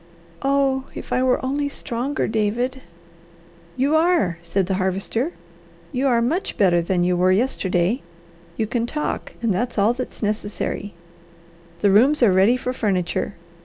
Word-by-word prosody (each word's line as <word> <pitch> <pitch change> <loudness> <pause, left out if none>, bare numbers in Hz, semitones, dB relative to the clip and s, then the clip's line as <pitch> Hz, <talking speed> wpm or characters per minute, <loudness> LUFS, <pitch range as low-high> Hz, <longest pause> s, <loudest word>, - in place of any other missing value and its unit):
"Oh 270 -1 +1
if - - -6
I 250 - +2
were 255 0 +2
only 285 +2 -1
stronger, 275 +2 -2
David!" 235 +4 -1 1.0
"You 280 +4 +2
are!" 315 - +2
said 175 +3 -1
the 190 - -1
Harvester. 195 - -1 0.6
"You 260 +2 0
are 235 -3 +3
much 335 - -1
better 175 -4 +4
than 175 +1 0
you 180 0 +2
were 180 +1 +3
yesterday. 190 0 +1 0.6
You 220 - +1
can 230 +2 -1
talk, 300 +4 -3
and 225 -4 +2
that's 235 +7 -2
all 210 +3 +4
that's 255 -2 -6
necessary. 205 -1 -3 0.9
The 200 - +4
rooms 255 +8 +5
are 205 -5 +5
ready 195 +7 +4
for 250 0 -3
furniture. 195 -4 -1
230 Hz, 150 wpm, -22 LUFS, 195-265 Hz, 1.0 s, rooms